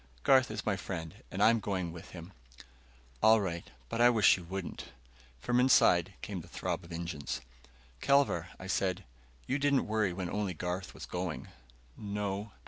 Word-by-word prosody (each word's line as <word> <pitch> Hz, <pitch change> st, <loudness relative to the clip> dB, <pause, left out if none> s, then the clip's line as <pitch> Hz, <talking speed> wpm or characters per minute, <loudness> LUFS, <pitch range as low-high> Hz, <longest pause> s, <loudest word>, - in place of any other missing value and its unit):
"Garth 130 Hz, -2 st, +5 dB
is 105 Hz, -1 st, -5 dB
my 105 Hz, -, +1 dB
friend 85 Hz, -4 st, -6 dB
and -, -, 0 dB
I'm 115 Hz, +1 st, +5 dB
going 95 Hz, -5 st, -2 dB
with 85 Hz, 0 st, -10 dB
him." 90 Hz, +2 st, -10 dB, 0.9 s
"All 110 Hz, 0 st, +7 dB
right. 85 Hz, -4 st, -3 dB, 0.2 s
But 115 Hz, -, -2 dB
I 120 Hz, -, +8 dB
wish 110 Hz, -4 st, +6 dB
you 90 Hz, -, -8 dB
wouldn't." 95 Hz, +1 st, -5 dB, 0.5 s
From 120 Hz, -, +1 dB
inside 95 Hz, -8 st, +5 dB
came 95 Hz, -4 st, -4 dB
the -, -, -14 dB
throb -, -, -3 dB
of 85 Hz, -, -13 dB
engines. 80 Hz, -7 st, -4 dB, 0.6 s
"Kelvar," 140 Hz, -, +3 dB
I -, -, -9 dB
said, 95 Hz, 0 st, 0 dB, 0.4 s
"you 135 Hz, -, -1 dB
didn't 140 Hz, -1 st, +2 dB
worry 110 Hz, -3 st, +1 dB
when 90 Hz, 0 st, -4 dB
only 105 Hz, -4 st, -2 dB
Garth 90 Hz, +3 st, -4 dB
was -, -, -7 dB
going." 90 Hz, -2 st, -4 dB, 0.5 s
"No." 105 Hz, 0 st, -3 dB
95 Hz, 165 wpm, -32 LUFS, 85-110 Hz, 0.9 s, I